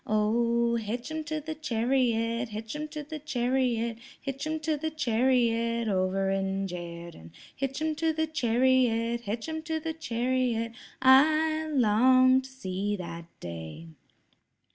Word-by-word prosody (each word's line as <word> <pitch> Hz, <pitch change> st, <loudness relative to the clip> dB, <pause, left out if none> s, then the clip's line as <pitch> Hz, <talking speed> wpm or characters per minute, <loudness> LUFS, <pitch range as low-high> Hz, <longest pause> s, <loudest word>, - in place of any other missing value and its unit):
"Oh, 235 Hz, +2 st, +2 dB
hitch 235 Hz, +5 st, -4 dB
'em 315 Hz, 0 st, -3 dB
to 310 Hz, +1 st, -2 dB
the 315 Hz, +1 st, -5 dB
chariot, 235 Hz, -4 st, 0 dB
hitch 220 Hz, +4 st, -6 dB
'em 305 Hz, +1 st, -4 dB
to 300 Hz, -1 st, -6 dB
the 305 Hz, +1 st, -7 dB
chariot, 245 Hz, -4 st, 0 dB, 0.2 s
Hitch 275 Hz, +2 st, -4 dB
'em 315 Hz, 0 st, -2 dB
to 310 Hz, 0 st, 0 dB
the 315 Hz, +2 st, -2 dB
chariot 235 Hz, -4 st, +1 dB
over 190 Hz, 0 st, +1 dB
in 195 Hz, 0 st, -1 dB
Jerden, 170 Hz, -, -8 dB, 0.3 s
Hitch 270 Hz, 0 st, -3 dB
'em 315 Hz, 0 st, +1 dB
to 325 Hz, 0 st, +1 dB
the 315 Hz, 0 st, 0 dB
chariot, 240 Hz, -4 st, +2 dB
hitch 225 Hz, +3 st, -4 dB
'em 315 Hz, 0 st, -3 dB
to 320 Hz, 0 st, -2 dB
the 320 Hz, +1 st, -3 dB
chariot, 245 Hz, -5 st, -1 dB, 0.3 s
I 310 Hz, +4 st, +5 dB
long 255 Hz, +1 st, +5 dB
to 260 Hz, -, -12 dB
see 205 Hz, -5 st, -3 dB
that 170 Hz, -3 st, -7 dB
day." 80 Hz, -1 st, -8 dB
240 Hz, 140 wpm, -28 LUFS, 220-295 Hz, 0.3 s, I